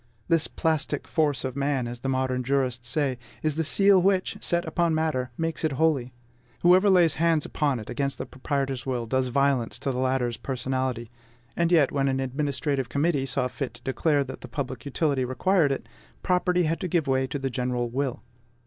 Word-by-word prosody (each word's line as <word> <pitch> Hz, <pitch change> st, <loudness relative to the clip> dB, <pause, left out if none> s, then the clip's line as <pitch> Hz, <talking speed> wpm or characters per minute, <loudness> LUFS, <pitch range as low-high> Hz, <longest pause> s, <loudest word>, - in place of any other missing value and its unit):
This 165 Hz, -1 st, +2 dB
plastic 155 Hz, -2 st, -1 dB
force 145 Hz, -5 st, 0 dB
of 130 Hz, -1 st, -4 dB
man, 140 Hz, -3 st, 0 dB
as 120 Hz, 0 st, -6 dB
the 135 Hz, -, -3 dB
modern 130 Hz, -1 st, 0 dB
jurists 125 Hz, -2 st, -1 dB
say, 135 Hz, -3 st, 0 dB, 0.2 s
is 155 Hz, -1 st, +1 dB
the 160 Hz, +2 st, -1 dB
seal 195 Hz, +4 st, +4 dB
which, 190 Hz, 0 st, +1 dB
set 170 Hz, 0 st, +1 dB
upon 170 Hz, -2 st, +1 dB
matter, 155 Hz, -6 st, 0 dB
makes 165 Hz, 0 st, -2 dB
it 155 Hz, -3 st, +1 dB
holy. 140 Hz, -4 st, +1 dB, 0.5 s
Whoever 185 Hz, +3 st, +6 dB
lays 175 Hz, -5 st, +5 dB
hands 165 Hz, -3 st, +3 dB
upon 140 Hz, -5 st, 0 dB
it, 110 Hz, -, -9 dB
against 140 Hz, -1 st, -2 dB
the -, -, -4 dB
proprietor's 135 Hz, -1 st, -3 dB
will, 125 Hz, -3 st, -2 dB
does 130 Hz, +2 st, 0 dB
violence 135 Hz, -2 st, +1 dB
to 135 Hz, +2 st, -2 dB
the 125 Hz, -, -3 dB
latter's 130 Hz, -2 st, 0 dB
personality. 130 Hz, -2 st, -3 dB, 0.4 s
And 170 Hz, 0 st, +1 dB
yet, 155 Hz, -6 st, +4 dB
when 140 Hz, -1 st, +1 dB
an 135 Hz, 0 st, 0 dB
administrative 135 Hz, 0 st, -1 dB
committee 140 Hz, -1 st, +1 dB
saw 130 Hz, -1 st, 0 dB
fit 130 Hz, -2 st, -5 dB
to 120 Hz, -, -17 dB
declare 145 Hz, +2 st, +1 dB
that 135 Hz, 0 st, -8 dB
public 130 Hz, -1 st, -5 dB
utility 140 Hz, -1 st, 0 dB
required 150 Hz, +5 st, +2 dB
it, 135 Hz, -, -3 dB, 0.4 s
property 180 Hz, 0 st, +2 dB
had 165 Hz, +1 st, 0 dB
to 185 Hz, -, -2 dB
give 170 Hz, -3 st, +1 dB
way 130 Hz, -1 st, +1 dB
to 130 Hz, -, -3 dB
the 135 Hz, -1 st, -3 dB
general 125 Hz, -1 st, -1 dB
will. 130 Hz, +1 st, -3 dB
140 Hz, 190 wpm, -26 LUFS, 130-160 Hz, 0.5 s, Whoever